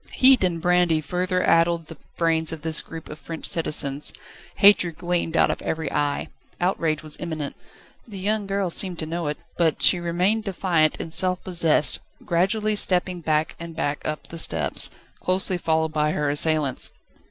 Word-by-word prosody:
Heat 260 -4 +6
and 175 -2 0
brandy 175 -2 +2
further 180 +4 -2
addled 165 0 +2
the 160 0 -11 0.2
brains 160 -1 +3
of 160 -1 -7
this 160 -1 +2
group 165 -1 -10
of 150 - -10
French 165 -1 -6
citizens; 150 -3 0 0.4
hatred 180 -5 +4
gleamed 175 -2 -1
out - - +4
of - - -5
every 160 -3 -3
eye. 145 -1 -1 0.3
Outrage 165 -4 -1
was 155 -1 -4
imminent. 155 -4 -5 0.5
The 205 -4 -8
young 205 +2 -1
girl 195 -2 -1
seemed 180 0 -1
to 160 - -3
know 165 0 -4
it, 150 - -3 0.2
but 160 -5 0
she 175 +6 +6
remained 180 +6 0
defiant 175 -5 0
and 160 - -6
self 185 0 +2
possessed, 165 -6 +1 0.3
gradually 210 +5 +1
stepping 180 -2 +1
back 155 0 -1
and 170 -1 -8
back 150 -2 -2
up 155 0 -4
the 165 - -5
steps, 80 - +2 0.3
closely 185 0 +1
followed 160 -1 0
by 150 0 0
her 150 -1 -1
assailants. 150 -2 +2
165 Hz, 170 wpm, -23 LUFS, 155-180 Hz, 0.5 s, Heat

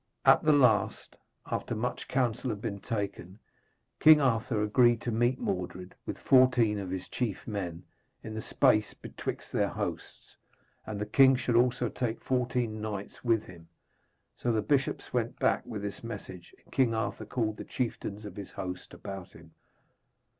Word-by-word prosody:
At - - +7
the 155 - +4
last, 125 -9 +3 0.3
after 120 - -3
much 115 +3 -3
counsel 125 -1 0
had 105 -3 -3
been 100 -2 -4
taken, 100 -3 -4 0.6
King 155 -1 +8
Arthur 115 -4 +1
agreed 120 +2 +4
to 120 - -2
meet 120 +3 +2
Mordred, 90 -2 -4
with - - -4
fourteen 125 -5 +4
of 95 -2 -5
his 95 0 -4
chief 115 -6 -3
men, 90 -5 -4 0.4
in 110 - -6
the 110 - -4
space 110 -6 +2
betwixt - - -6
their - - +2
hosts, - - -6 0.5
and 105 -2 -4
the 105 - -1
king 130 +5 +6
should 125 -2 -1
also 125 0 +3
take 115 -1 -3
fourteen 125 -4 -1
knights 105 -2 -6
with 115 -3 +2
him. 85 -2 -13 0.7
So 120 - 0
the 110 -2 +1
bishops 135 +4 0
went - - -1
back - - +1
with 105 -2 -5
this 100 +2 -5
message, 95 -6 -8
and - - -19
King 125 -4 +3
Arthur 110 0 -2
called 110 -3 -1
the - - -6
chieftains 105 -4 -4
of 100 -3 -8
his 100 -1 -7
host 90 -2 -6
about 95 -1 -8
him. 80 0 -15
110 Hz, 165 wpm, -30 LUFS, 100-125 Hz, 0.7 s, King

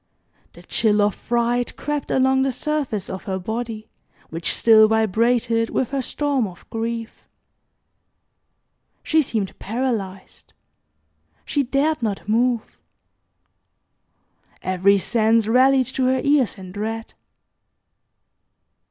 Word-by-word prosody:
The - - -15
chill 215 -2 +1
of 205 0 +2
fright 240 +1 -1
crept 295 -1 -3
along 265 0 +2
the 270 0 +1
surface 265 -7 -3
of 190 - -7
her 190 -2 -2
body, 220 +3 -5 0.4
which 165 +1 -1
still 220 -1 +6
vibrated 230 +2 +1
with 260 - -1
her 275 -1 -1
storm 275 -3 -1
of 180 -2 -14
grief. 230 0 -4 1.8
She 315 0 +3
seemed 220 -8 -3
paralyzed. 215 -5 -4 0.9
She 290 - 0
dared 280 +4 0
not 205 -3 -3
move. 235 +1 0 1.8
Every 185 +2 +3
sense 225 +2 +2
rallied 260 +3 +4
to 260 - 0
her 260 +1 +2
ears 280 -6 +2
in 185 -1 -10
dread. 220 +3 -5
230 Hz, 110 wpm, -22 LUFS, 215-260 Hz, 1.8 s, still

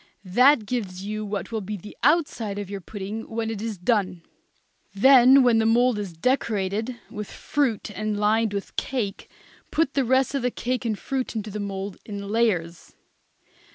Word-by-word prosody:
That 245 +5 +5
gives 200 -5 -4
you 215 +1 -3
what 205 -1 -4
will 220 -1 -2
be 205 +2 -5
the 205 +3 -11
outside 255 -8 +1
of 205 -1 -5
your 200 -1 -5
pudding 205 +3 -6
when 225 0 -2
it 210 -2 -5
is 220 -2 -4
done. 185 -3 0 0.7
Then 260 +4 +7
when 240 -2 +4
the 220 - +2
mould 240 0 +3
is 200 -3 -4
decorated 220 0 0 0.2
with 210 -3 -6
fruit 255 -8 -1
and 215 -1 -2
lined 215 +1 +2
with 200 -1 -5
cake, 230 -7 -3 0.4
put 310 -4 +1
the 275 - +2
rest 260 +2 +2
of 275 - 0
the 250 - +1
cake 250 +1 -3
and 220 -3 -1
fruit 260 0 -3
into 215 -1 -4
the 210 - -5
mould 195 -1 -4
in 200 -2 -6
layers. 185 -7 -1
215 Hz, 175 wpm, -24 LUFS, 200-245 Hz, 0.7 s, Then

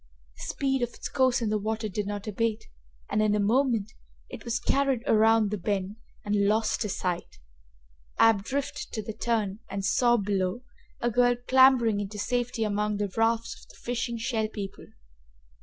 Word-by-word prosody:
The - - -8
speed 270 -2 -1
of 240 0 -2
its - - -5
course 255 -2 +2
in 220 - 0
the 215 - +1
water 220 +1 -2
did 205 0 -3
not 205 0 -4
abate 220 +1 -1 0.4
and, 215 - 0
in 210 -1 +3
a - - +1
moment, 225 0 +1 0.4
it - - -9
was 235 0 -1
carried 270 -2 +1
around 220 -3 +4
the 210 - -2
bend, 195 +2 -2 0.3
and 205 -1 +2
lost 215 +1 +1
to 210 - -1
sight. 180 -2 -3 0.8
Ab 225 -3 +5
drifted 275 +5 -4
to 215 - -3
the 220 - -5
turn 215 -3 -1
and 195 0 -3
saw, 240 +2 +3
below, 195 +2 -1 0.4
a 240 - +1
girl 245 +1 +4
clambering 255 -5 +5
into 205 +1 -5
safety 245 +1 -1
among 210 0 0
the 200 -2 -3
rafts 230 0 +1
of - - -20
the - - -16
fishing 240 -1 -3
Shell 225 -2 -1
People. 205 -3 -7
220 Hz, 175 wpm, -27 LUFS, 205-240 Hz, 0.8 s, Ab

